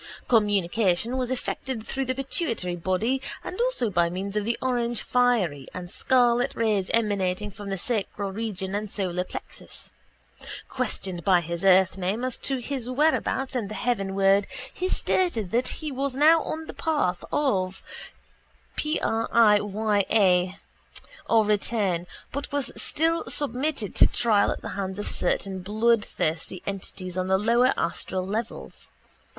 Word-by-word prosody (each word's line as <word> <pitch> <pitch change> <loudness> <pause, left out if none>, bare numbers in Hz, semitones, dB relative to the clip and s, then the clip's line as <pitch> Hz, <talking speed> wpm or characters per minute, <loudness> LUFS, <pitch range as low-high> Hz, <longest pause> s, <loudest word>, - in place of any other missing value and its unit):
Communication 205 0 +2
was 255 -2 -1
effected 260 -2 -3
through 270 0 -2
the 255 0 -1
pituitary 255 - -2
body 190 +10 0 0.2
and 370 - -4
also 480 - +1
by 170 -2 +2
means 195 +3 -4
of 210 - +1
the 230 +3 -1
orangefiery 240 - +1
and 180 -1 -5
scarlet 245 0 +2
rays 210 -4 +1
emanating 205 -2 0
from 200 +1 -8
the 195 - -2
sacral 200 -1 -2
region 195 -2 -4
and 210 +1 -2
solar 180 -3 -1
plexus. - - -9 0.8
Questioned 190 -9 -3
by 185 0 +5
his 170 +1 -4
earthname 190 +4 +3
as 255 - -3
to 270 - -1
his 250 0 -4
whereabouts 265 -1 +1
in 230 -5 -1
the 215 - -6
heavenworld 195 -4 +2 0.3
he 370 +1 -2
stated 235 - 0
that 245 +2 +1
he 310 -2 -4
was 270 0 -2
now 315 +4 +6
on 320 +1 -4
the - - -8
path 290 - 0
of 190 -10 0 0.9
prālāyā 210 - +2 0.7
or 225 -2 +5
return 200 -4 0 0.2
but 280 +2 -4
was 285 -2 -1
still 325 +2 0
submitted 275 -5 -1
to - - +6
trial 220 -4 +2
at - - -3
the - - -4
hands 190 -1 -4
of 205 - -4
certain 190 -1 -1
bloodthirsty 205 -4 0
entities 185 -2 -5
on 185 0 -1
the 190 0 +3
lower 235 +5 +3
astral 185 -1 -2
levels. 220 +4 -5
215 Hz, 135 wpm, -26 LUFS, 190-250 Hz, 0.9 s, now